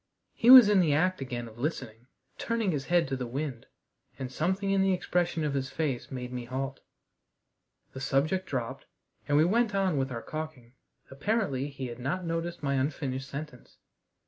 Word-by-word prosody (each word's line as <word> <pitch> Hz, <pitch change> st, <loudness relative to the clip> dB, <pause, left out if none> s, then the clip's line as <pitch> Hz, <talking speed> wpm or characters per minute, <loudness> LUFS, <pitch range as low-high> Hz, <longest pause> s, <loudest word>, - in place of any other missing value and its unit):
He 235 Hz, -, +2 dB
was 255 Hz, -4 st, +12 dB
in 205 Hz, -2 st, +4 dB
the 155 Hz, -5 st, +3 dB
act 185 Hz, +2 st, +1 dB
again 120 Hz, -2 st, -4 dB
of 115 Hz, +1 st, -14 dB
listening, 120 Hz, -5 st, -4 dB, 0.3 s
turning 230 Hz, -4 st, 0 dB
his 140 Hz, -4 st, -3 dB
head 175 Hz, -2 st, +2 dB
to 135 Hz, -, -2 dB
the 125 Hz, -2 st, -4 dB
wind, 130 Hz, -1 st, -4 dB, 0.5 s
and 130 Hz, -1 st, -5 dB
something 190 Hz, +7 st, 0 dB
in 195 Hz, -1 st, +3 dB
the 190 Hz, 0 st, +3 dB
expression 175 Hz, -2 st, -1 dB
of 150 Hz, -2 st, -1 dB
his 135 Hz, -1 st, -2 dB
face 145 Hz, -6 st, -2 dB
made 125 Hz, -2 st, -6 dB
me 125 Hz, -1 st, -4 dB
halt. 130 Hz, +2 st, -4 dB, 1.1 s
The 130 Hz, -, -7 dB
subject 155 Hz, +8 st, 0 dB
dropped, 120 Hz, -4 st, -4 dB, 0.4 s
and 145 Hz, -, +3 dB
we 155 Hz, -, +5 dB
went 220 Hz, +2 st, +2 dB
on 190 Hz, -5 st, +1 dB
with 135 Hz, -1 st, -1 dB
our 115 Hz, -2 st, -5 dB
caulking. 155 Hz, -6 st, -7 dB, 0.4 s
Apparently 145 Hz, -, -1 dB
he 135 Hz, -2 st, -6 dB
had 120 Hz, -1 st, -7 dB
not 155 Hz, +9 st, -2 dB
noticed 165 Hz, 0 st, -3 dB
my 140 Hz, -1 st, 0 dB
unfinished 135 Hz, -1 st, -2 dB
sentence. 140 Hz, -3 st, -8 dB
145 Hz, 180 wpm, -29 LUFS, 130-180 Hz, 1.1 s, was